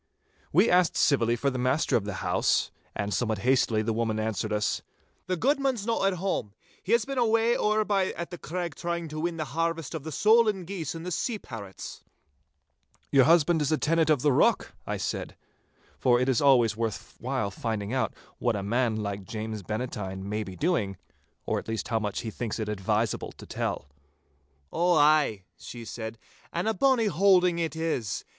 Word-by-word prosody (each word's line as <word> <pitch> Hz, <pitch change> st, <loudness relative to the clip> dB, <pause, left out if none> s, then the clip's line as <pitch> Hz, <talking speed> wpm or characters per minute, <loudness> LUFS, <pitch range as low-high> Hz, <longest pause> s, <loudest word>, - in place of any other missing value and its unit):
We 185 Hz, +9 st, +5 dB
asked 180 Hz, -4 st, +3 dB
civilly 120 Hz, -5 st, +3 dB
for 140 Hz, +4 st, 0 dB
the 130 Hz, -, -3 dB
master 130 Hz, +5 st, +1 dB
of 105 Hz, -, +1 dB
the 105 Hz, -2 st, -4 dB
house, -, -, +2 dB, 0.2 s
and 100 Hz, 0 st, -2 dB
somewhat 110 Hz, -3 st, 0 dB
hastily 120 Hz, -4 st, +3 dB
the 115 Hz, +1 st, 0 dB
woman 110 Hz, -1 st, -1 dB
answered 110 Hz, 0 st, -2 dB
us,— 105 Hz, 0 st, 0 dB, 0.5 s
'The 185 Hz, 0 st, 0 dB
guidman's 270 Hz, -, +1 dB
no 230 Hz, -3 st, 0 dB
at 195 Hz, -1 st, +2 dB
hame. 175 Hz, -, -2 dB, 0.3 s
He 205 Hz, -, -1 dB
has 235 Hz, -2 st, +3 dB
been 275 Hz, -1 st, -2 dB
away 230 Hz, 0 st, +3 dB
ower 215 Hz, 0 st, +2 dB
by 195 Hz, -3 st, +2 dB
at 170 Hz, +1 st, -6 dB
the 175 Hz, -, -7 dB
Craig 175 Hz, -1 st, -4 dB
trying 170 Hz, +2 st, -3 dB
to 155 Hz, +1 st, -5 dB
win 170 Hz, +1 st, -2 dB
the 155 Hz, -, -2 dB
harvest 165 Hz, -2 st, -1 dB
of 160 Hz, -4 st, -5 dB
the 160 Hz, -, -6 dB
solan 215 Hz, 0 st, +3 dB
geese 170 Hz, -4 st, -4 dB
and 170 Hz, +2 st, -4 dB
sea 230 Hz, +7 st, -1 dB
parrots.' 100 Hz, -, -9 dB, 1.1 s
'Your 135 Hz, -2 st, +6 dB
husband 165 Hz, +1 st, +4 dB
is 150 Hz, +1 st, 0 dB
tenant 165 Hz, 0 st, +2 dB
of 145 Hz, -4 st, +3 dB
the 150 Hz, -, +4 dB
rock?' 125 Hz, -, +2 dB
I -, -, -2 dB
said, -, -, -4 dB, 0.6 s
for 120 Hz, -1 st, +4 dB
it 125 Hz, -, +1 dB
is 130 Hz, -3 st, +2 dB
always 125 Hz, -6 st, +5 dB
worth 115 Hz, -2 st, -4 dB
while 120 Hz, -5 st, -2 dB
finding 110 Hz, +1 st, -3 dB
out 130 Hz, -, 0 dB, 0.3 s
what -, -, +1 dB
a 100 Hz, -, -3 dB
man 115 Hz, +2 st, +1 dB
like 100 Hz, -2 st, -3 dB
James 110 Hz, +1 st, -5 dB
Bannatyne 105 Hz, -3 st, -4 dB
may 105 Hz, +1 st, -2 dB
be 95 Hz, -2 st, -8 dB
doing, 110 Hz, -, 0 dB, 0.5 s
or -, -, 0 dB
at -, -, -11 dB
least 110 Hz, -1 st, -3 dB
how 115 Hz, -2 st, +1 dB
much 105 Hz, -2 st, -3 dB
he 110 Hz, -, -5 dB
thinks 115 Hz, 0 st, -4 dB
it 110 Hz, -2 st, -3 dB
advisable 105 Hz, +2 st, -1 dB
to -, -, -12 dB
tell. -, -, -3 dB, 0.9 s
'Ow 175 Hz, +1 st, +3 dB
ay,'she 140 Hz, -, +1 dB
said, 110 Hz, 0 st, -6 dB, 0.3 s
'and 170 Hz, +4 st, -2 dB
a 220 Hz, -, +2 dB
bonny 260 Hz, -2 st, +3 dB
holding 180 Hz, -2 st, +4 dB
it 165 Hz, -1 st, -2 dB
is. 155 Hz, -, -2 dB
140 Hz, 185 wpm, -27 LUFS, 110-175 Hz, 1.1 s, Your